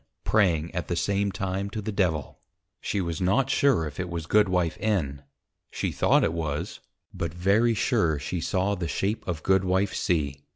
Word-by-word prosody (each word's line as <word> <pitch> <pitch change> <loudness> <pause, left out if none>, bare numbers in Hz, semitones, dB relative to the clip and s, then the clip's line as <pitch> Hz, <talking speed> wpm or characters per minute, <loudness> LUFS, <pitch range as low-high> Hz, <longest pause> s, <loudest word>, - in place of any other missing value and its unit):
_ - - -54
Praying 85 -7 +2
at 90 - -3
the 85 - -1
same 100 +3 0
time 95 0 -3
to 110 - -5
the 110 +1 -3
Devil; 85 -8 -1 0.4
she 100 - -2
was 85 -2 -3
not 105 +9 +2
sure 135 - +3
it 85 +5 -5
was 85 -2 -4
Goodwife 90 -3 +2
N. 85 -11 -1 0.5
she - - -2
thought - - +3
it - - +1
was; 80 +1 -3 0.3
but 85 - -3
very 100 +7 +2
sure 105 - +1
she 85 +4 -4
saw 95 +3 0
the 90 -4 -3
shape 100 +6 -1
of 85 -3 -3
Goodwife 95 +1 +2
_C. 70 -5 -1
90 Hz, 175 wpm, -26 LUFS, 80-100 Hz, 0.5 s, sure